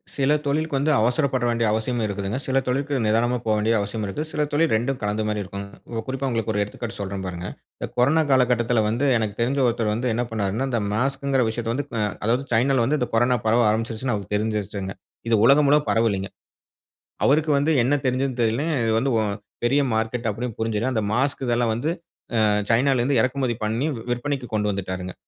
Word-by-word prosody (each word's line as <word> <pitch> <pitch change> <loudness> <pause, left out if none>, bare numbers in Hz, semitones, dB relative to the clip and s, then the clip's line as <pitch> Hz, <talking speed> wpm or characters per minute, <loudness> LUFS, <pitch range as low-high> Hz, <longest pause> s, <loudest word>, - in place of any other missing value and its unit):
சில 140 +1 +2
தொழிலுக்கு 145 0 0
வந்து 145 +3 +1
அவசரப்பட 125 +3 +1
வேண்டிய 115 -1 +1
அவசியமும் 110 +2 -1
இருக்குதுங்க. 100 +2 -3
சில 135 0 +2
தொழிலுக்கு 140 +3 -1
நிதானமா 115 +3 +2
போக 110 - +2
வேண்டிய 110 +2 +1
அவசியம் 105 +2 -3
இருக்கு. 100 +9 -4
சில 150 - -2
தொழில் 160 +2 +2
இரண்டும் 125 +4 0
கலந்த 105 +1 -1
மாதிரி 105 -1 -1
இருக்குங்க. 100 +1 -8 0.3
குறிப்பா 135 +1 -2
உங்களுக்கு 115 -2 -1
ஒரு 105 - +1
எடுத்துக்காட்டு 110 +3 -7
சொல்றேன் 100 -1 -4
பாருங்க. 90 0 -5 0.3
இந்த - - -3
கொரோனா 140 +6 +4
காலகட்டத்தில 120 -3 +3
வந்து 120 +6 0
எனக்கு 110 -2 -2
தெரிந்த 135 +4 +1
ஒருத்தர் 115 -3 +1
வந்து 120 +3 -1
என்ன 120 +2 -1
பண்ணார்னா 110 +4 -1
இந்த 115 -2 0
மாஸ்க்குங்குற 135 +3 +1
விஷயத்தை 115 0 -3
வந்து 140 +3 -2
அ - - +1 0.2
அதாவது 120 +5 +1
சைனால 125 +1 +3
வந்து 150 +4 +1
இந்த 125 - -1
கொரோனா 120 +2 +3
பரவ 115 +1 +4
ஆரம்பிச்சிருச்சுன்னு 115 +2 -1
அவருக்கு 100 0 -3
தெரிஞ்சிருச்சுங்க. 105 -2 -3 0.3
இது 115 - +4
உலகம் 140 +3 +5
முழுக்க 150 +1 +5
பரவலீங்க. 100 -3 +1 0.9
அவருக்கு 150 +2 +3
வந்து 145 +3 +2
என்ன 135 - +2
தெரிஞ்சதுன்னு 130 0 -1
தெரியலை. 115 +6 0 0.2
இது 115 - +1
வந்து 135 +3 0
வ - - +2 0.4
பெரிய 140 +4 +3
மார்க்கெட் 115 +2 -1
அப்படின்னு 115 +2 -4
புரிஞ்சிட்டு 115 +2 -1
அந்த 110 - +1
மாஸ்க் 135 +3 0
இதெல்லாம் 120 -1 +1
வந்து 125 +7 -1 0.6
அ - - +4 0.2
சைனால 130 +3 +3
இருந்து 130 0 +2
இறக்குமதி 130 0 0
பண்ணி 115 +6 -1
வி 115 - -7
விற்பனைக்கு 130 +1 -2
கொண்டு 105 -1 +1
வந்துட்டாருங்க. 95 -2 -4
120 Hz, 190 wpm, -23 LUFS, 110-135 Hz, 0.9 s, உலகம்